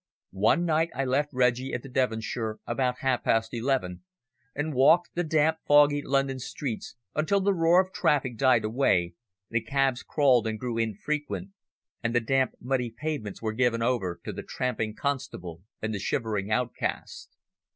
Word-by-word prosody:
One 170 - +4
night 165 0 +2
I 135 - -1
left 140 +3 +1
Reggie 125 0 +1
at 125 - -5
the - - -9
Devonshire 110 -3 -1
about 125 +1 -1
half 130 -2 +1
past 115 +1 +1
eleven 120 - -1 0.5
and 145 +2 -2
walked 155 +7 +4
the 175 - 0
damp, 160 0 +2
foggy 145 0 +5
London 135 -1 0
streets 130 -2 -5 0.2
until 160 +6 +1
the 200 +1 +2
roar 170 0 +4
of 185 0 0
traffic 145 -7 +1
died 125 -3 +3
away, 110 -7 +1 0.4
the 115 0 +1
cabs 135 +2 0
crawled 130 -6 +3
and 110 -1 -3
grew 120 -2 -3
infrequent 145 - -3 0.5
and 115 +1 -1
the - - +5
damp, 130 +3 +1
muddy 125 -1 -1
pavements 115 -5 -5
were 110 -1 -1
given 115 -1 +1
over 115 -8 -1
to - - -4
the - - -5
tramping 110 -4 -3
constable 90 - -4 0.2
and 110 0 -1
the 100 - -3
shivering 105 -1 -2
outcast. 110 -9 -3
125 Hz, 160 wpm, -27 LUFS, 115-145 Hz, 0.5 s, foggy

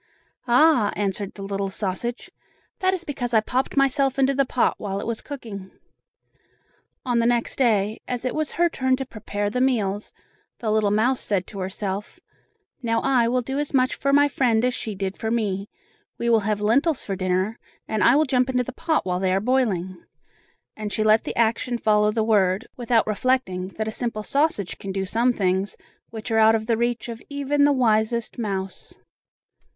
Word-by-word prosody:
"Ah!" 245 -3 +4
answered 200 0 -2
the 200 - -8
little 195 0 -2
sausage, 205 +5 -4 0.5
"that 375 0 +2
is 370 -2 -3
because 245 -6 -2
I - - +7
popped 255 +6 -2
myself 275 0 +2
into 270 0 +3
the 275 0 +2
pot 250 - +2
while 195 -1 -3
it - - -5
was 230 -1 -3
cooking." 220 -9 -8 1.4
On 245 -2 +1
the 230 - +2
next 240 -1 0
day, 215 -4 +2
as 250 0 -3
it 255 - -1
was 310 -1 -2
her 345 0 +3
turn 260 -5 +1
to 270 +1 -5
prepare 205 -3 -4
the 250 - -1
meals, 210 -6 0 0.5
the 220 -4 -2
little 215 -1 +2
mouse 230 +5 +2
said 195 -3 -1
to 200 - -9
herself: 195 - -4 0.6
"Now 230 -2 +1
I 255 -4 +3
will 250 +1 +1
do 265 +4 -3
as 295 -1 -2
much 255 -1 +3
for 275 - -1
my 285 +1 +5
friend 245 -5 +1
as 250 - +1
she 220 -3 -4
did 195 0 -4
for 220 - -2
me; 205 -4 -1 0.5
we 235 0 0
will 225 - +5
have 210 0 -1
lentils 275 +8 +2
for 195 - -3
dinner, 185 +4 -1 0.3
and 215 -1 0
I 245 - +6
will 310 +2 +4
jump 255 -1 +1
into 250 -1 +1
the 260 - -7
pot 315 - 0
while 180 -1 -1
they 190 -1 +1
are 190 - +2
boiling," 195 -7 0 0.7
and 210 -1 -5
she 215 - 0
let 215 +1 +4
the - - -4
action 235 +2 +1
follow 210 -2 +3
the 220 0 0
word, 205 -1 +2
without 240 -2 +1
reflecting 215 -4 0
that 220 0 -2
a - - -2
simple 230 -2 -3
sausage 280 - 0
can 195 - -5
do 190 0 -2
some 235 +6 +2
things 190 -2 -1 0.3
which 220 0 -7
are 225 - +3
out 220 0 +6
of 220 -1 -2
the 230 0 +1
reach 235 0 -1
of 230 -1 -7
even 285 0 +1
the 290 - +4
wisest 235 -2 +1
mouse. 195 -4 -4
225 Hz, 195 wpm, -23 LUFS, 205-255 Hz, 1.4 s, I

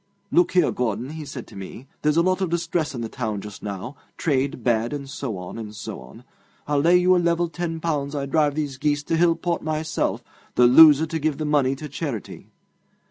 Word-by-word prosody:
"Look 350 - +3
here, 180 -4 +4
Gordon," 120 +2 -2
he 155 -1 -7
said 130 -3 -7
to - - -15
me: 95 +6 -9 0.2
"there's 150 +1 +2
a 170 - +5
lot 185 +1 +1
of 185 - 0
distress 170 -3 -1
in 120 - -4
the 115 - -3
town 110 -3 -3
just 105 0 -9
now 105 +7 -6 0.2
trade 140 -3 -1
bad, 115 +1 +1
and 140 -1 -5
so 135 -6 -5
on, 90 +5 -7
and 105 -1 -7
so - - -7
on. - - -14 0.4
I'll 145 -1 +1
lay 170 +5 +5
you 180 +1 +4
a - - +4
level 170 0 +1
ten 165 -1 -4
pounds 150 -3 -2
I 140 -1 -2
drive 145 0 +1
these 145 -3 -3
geese 145 +1 0
to 165 - -1
Hillport 170 +1 +1
myself, 155 +1 -2 0.3
the 125 - +6
loser 150 +4 +8
to 160 0 -3
give 155 -2 -1
the 155 - -3
money 140 -3 +2
to 150 +3 -7
charity." 140 -6 -6
145 Hz, 215 wpm, -23 LUFS, 125-165 Hz, 0.4 s, loser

